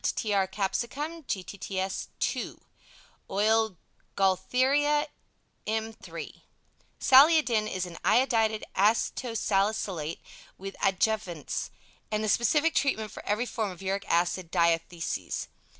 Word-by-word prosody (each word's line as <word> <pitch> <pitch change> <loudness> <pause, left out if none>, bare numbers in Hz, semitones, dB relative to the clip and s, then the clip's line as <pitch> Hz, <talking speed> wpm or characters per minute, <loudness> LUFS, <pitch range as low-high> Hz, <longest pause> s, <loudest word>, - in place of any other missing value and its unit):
to - - 0
Tr. 200 -3 +1
Capsicum 245 - -3
Gtts 190 -1 -3 0.3
ii - - -4 0.7
Oil 215 0 +2 0.4
Gaultheria, 260 +10 +2 0.6
m 220 +1 -1
iii - - -9 0.6
Saliodin 260 -6 +5
is 185 -1 -2
an 170 -2 -9
"Iodated 220 0 +3
Aceto 225 +3 +1
Salicylate 195 -6 0 0.4
with 195 +1 -7
Adjuvants" 190 -4 0 0.4
and 215 0 0
the 215 - 0
specific 295 +9 +3
treatment 220 -7 0
for - - -9
every 215 +4 +1
form 220 -4 -2
of 185 0 -10
uric 195 +1 -2
acid 175 +1 +1
diathesis. 170 -1 -1
210 Hz, 105 wpm, -28 LUFS, 190-235 Hz, 0.7 s, Saliodin